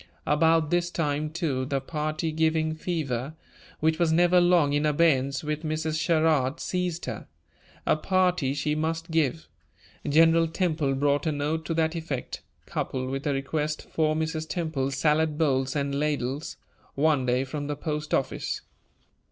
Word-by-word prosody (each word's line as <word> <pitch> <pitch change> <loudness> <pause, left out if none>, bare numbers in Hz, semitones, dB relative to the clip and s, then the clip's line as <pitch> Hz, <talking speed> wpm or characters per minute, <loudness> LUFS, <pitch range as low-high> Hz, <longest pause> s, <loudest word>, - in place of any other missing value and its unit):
About 160 +1 +3
this 175 0 +1
time, 150 -3 -1
too, 155 -6 -1
the 135 +1 -1
party 155 +3 -3
giving 160 0 +1
fever, 155 -5 -3 0.5
which 160 +1 +2
was 170 -2 +3
never 175 +2 +5
long 175 -5 +4
in 145 +1 +1
abeyance 145 -3 +2
with 150 0 -2
Mrs. 155 0 -2
Sherrard, 155 -3 +2
seized 180 -2 -2
her. - - -6 0.6
A - - +4
party 180 -5 +1
she 145 +1 0
must 160 +2 -2
give. 130 - 0 0.6
General 165 +2 +5
Temple 160 -5 0
brought 145 +2 +1
a - - +2
note 150 +2 -2
to 165 - -2
that 160 0 +1
effect, 155 -6 -4 0.2
coupled 130 0 -3
with 135 +2 -3
a 145 - +2
request 150 +3 -2
for 155 -1 +1
Mrs. 160 0 -2
Temple's 150 -6 -2
salad 150 +1 +2
bowls 135 -4 +1
and 140 -1 -1
ladles, 145 -1 -2 0.4
one 145 -3 +2
day 125 +2 +2
from 145 +2 -5
the 145 - -2
post 150 0 -4
office. 135 - -1
155 Hz, 150 wpm, -26 LUFS, 140-160 Hz, 0.6 s, never